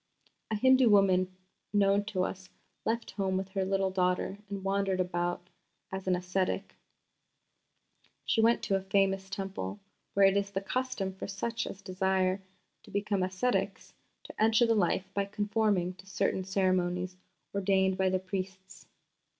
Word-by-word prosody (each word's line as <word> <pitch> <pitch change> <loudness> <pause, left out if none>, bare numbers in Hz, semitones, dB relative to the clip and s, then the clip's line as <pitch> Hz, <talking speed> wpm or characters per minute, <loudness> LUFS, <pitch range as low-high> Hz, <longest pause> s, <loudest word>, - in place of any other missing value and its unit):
A 220 - 0
Hindu 260 +2 +5
woman 185 -2 +4 0.3
known 200 0 +3
to 195 -4 -1
us 185 0 -5 0.4
left 230 +1 -1
home 190 -2 -1
with 190 0 -3
her 190 0 -1
little 195 0 +1
daughter 185 +1 0
and 200 -1 -5
wandered 195 -1 0
about 175 -1 -1 0.4
as 190 0 -5
an 185 - +3
ascetic. 185 +2 -1 1.5
She 225 - +2
went 230 +1 +4
to 195 - +1
a 195 - 0
famous 195 0 +1
Temple, 190 - -4 0.4
where 200 0 +6
it 195 0 +5
is 200 0 +1
the 195 -1 -2
custom 200 -2 -2
for 190 - -6
such 225 +4 -3
as 195 - -8
desire 190 0 +1 0.4
to - - -17
become 200 -1 0
ascetics 185 +7 -1 0.3
to - - -8
enter 225 +2 +5
the 230 - +3
life 190 -2 +1
by 200 0 0
conforming 205 -3 0
to 190 - -15
certain 195 -1 0
ceremonies 185 -1 0 0.4
ordained 190 -1 +2
by 190 0 +2
the 185 - +2
priests. 190 0 -6
195 Hz, 150 wpm, -30 LUFS, 185-200 Hz, 1.5 s, where